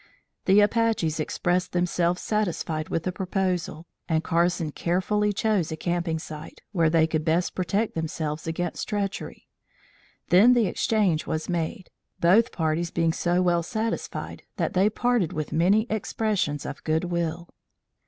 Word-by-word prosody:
The 195 Hz, +2 st, +6 dB
Apaches 210 Hz, -7 st, +1 dB
expressed 180 Hz, +3 st, -1 dB
themselves 175 Hz, 0 st, 0 dB
satisfied 175 Hz, -7 st, -1 dB
with 165 Hz, -, -1 dB
the 185 Hz, -, -1 dB
proposal, 180 Hz, -3 st, -2 dB, 0.2 s
and 160 Hz, 0 st, +1 dB
Carson 170 Hz, -1 st, +1 dB
carefully 200 Hz, +6 st, 0 dB
chose 200 Hz, -5 st, 0 dB
a 160 Hz, -, -4 dB
camping 170 Hz, -1 st, -1 dB
site, 155 Hz, -1 st, -9 dB
where 165 Hz, -5 st, +3 dB
they 160 Hz, 0 st, +4 dB
could 155 Hz, -1 st, -1 dB
best 165 Hz, +2 st, +1 dB
protect 200 Hz, +5 st, -1 dB
themselves 155 Hz, -1 st, -3 dB
against 175 Hz, +2 st, -3 dB
treachery. 200 Hz, -2 st, -4 dB, 0.8 s
Then 205 Hz, +8 st, +7 dB
the 240 Hz, -3 st, +3 dB
exchange 195 Hz, -6 st, +1 dB
was 155 Hz, 0 st, -2 dB
made, 175 Hz, +3 st, -3 dB, 0.3 s
both 210 Hz, +8 st, +4 dB
parties 165 Hz, +1 st, -1 dB
being 165 Hz, -1 st, +1 dB
so 175 Hz, +1 st, +1 dB
well 175 Hz, -1 st, +2 dB
satisfied 220 Hz, +7 st, -4 dB, 0.2 s
that -, -, -1 dB
they 190 Hz, +3 st, +4 dB
parted 235 Hz, -5 st, 0 dB
with 155 Hz, -1 st, -4 dB
many 190 Hz, +7 st, +3 dB
expressions 210 Hz, -, -1 dB
of 140 Hz, -, -7 dB
good 160 Hz, +1 st, +1 dB
will. 170 Hz, -1 st, -2 dB
175 Hz, 145 wpm, -26 LUFS, 160-200 Hz, 0.8 s, Then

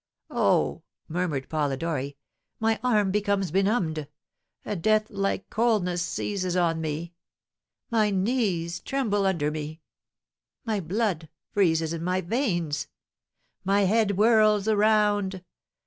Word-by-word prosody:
"Oh," -, -, +2 dB, 0.3 s
murmured 160 Hz, -5 st, -2 dB
Polidori, 145 Hz, -1 st, -2 dB, 0.4 s
"my 225 Hz, 0 st, +1 dB
arm 210 Hz, -6 st, +2 dB
becomes 200 Hz, -3 st, 0 dB
benumbed 185 Hz, -6 st, +1 dB, 0.6 s
a 210 Hz, -, -2 dB
deathlike 205 Hz, +1 st, 0 dB
coldness 205 Hz, -6 st, +1 dB
seizes 185 Hz, 0 st, -2 dB
on 165 Hz, -2 st, +1 dB
me 160 Hz, +2 st, -4 dB, 0.8 s
my 215 Hz, -2 st, +3 dB
knees 190 Hz, -5 st, 0 dB
tremble 210 Hz, -8 st, 0 dB
under 160 Hz, -6 st, 0 dB
me 155 Hz, +1 st, -5 dB, 0.9 s
my 220 Hz, -3 st, 0 dB
blood 180 Hz, -3 st, -1 dB, 0.2 s
freezes 165 Hz, -5 st, +2 dB
in 165 Hz, 0 st, -4 dB
my 180 Hz, +1 st, 0 dB
veins 175 Hz, -, -1 dB, 0.8 s
my 200 Hz, +1 st, +2 dB
head 205 Hz, +1 st, +3 dB
whirls 215 Hz, -1 st, +4 dB
around. 205 Hz, -3 st, +2 dB
190 Hz, 105 wpm, -26 LUFS, 165-210 Hz, 0.9 s, whirls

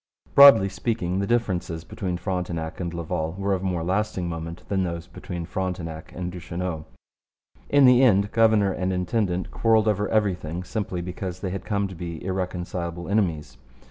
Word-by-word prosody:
Broadly 140 Hz, -8 st, +9 dB
speaking, 95 Hz, -2 st, -2 dB
the 100 Hz, -, -1 dB
differences 90 Hz, -8 st, -1 dB
between 90 Hz, -1 st, -4 dB
Frontenac 90 Hz, -4 st, -3 dB
and 85 Hz, -2 st, -3 dB
Laval 80 Hz, -1 st, -3 dB
were 100 Hz, 0 st, 0 dB
of 95 Hz, -, -1 dB
more 90 Hz, -3 st, -1 dB
lasting 95 Hz, 0 st, -1 dB
moment 85 Hz, +1 st, -6 dB
than 95 Hz, -1 st, 0 dB
those 85 Hz, -2 st, -4 dB
between 85 Hz, -1 st, -7 dB
Frontenac 90 Hz, -3 st, -4 dB
and 90 Hz, 0 st, -4 dB
Duchesneau. 90 Hz, -2 st, -5 dB, 0.8 s
In 145 Hz, -1 st, +6 dB
the 125 Hz, 0 st, +7 dB
end 100 Hz, -5 st, +4 dB
governor 110 Hz, -3 st, +4 dB
and 95 Hz, 0 st, -1 dB
intendant 90 Hz, 0 st, -1 dB
quarrelled 110 Hz, -1 st, +3 dB
over 105 Hz, -1 st, +1 dB
everything 90 Hz, -5 st, 0 dB
simply 95 Hz, -2 st, -3 dB
because 90 Hz, +1 st, -5 dB
they 95 Hz, -, -3 dB
had 95 Hz, -1 st, -5 dB
come 100 Hz, -1 st, 0 dB
to 95 Hz, -, -9 dB
be 85 Hz, -1 st, -7 dB
irreconcilable 90 Hz, -2 st, -3 dB
enemies. 80 Hz, -, -1 dB
90 Hz, 160 wpm, -25 LUFS, 85-100 Hz, 0.8 s, Broadly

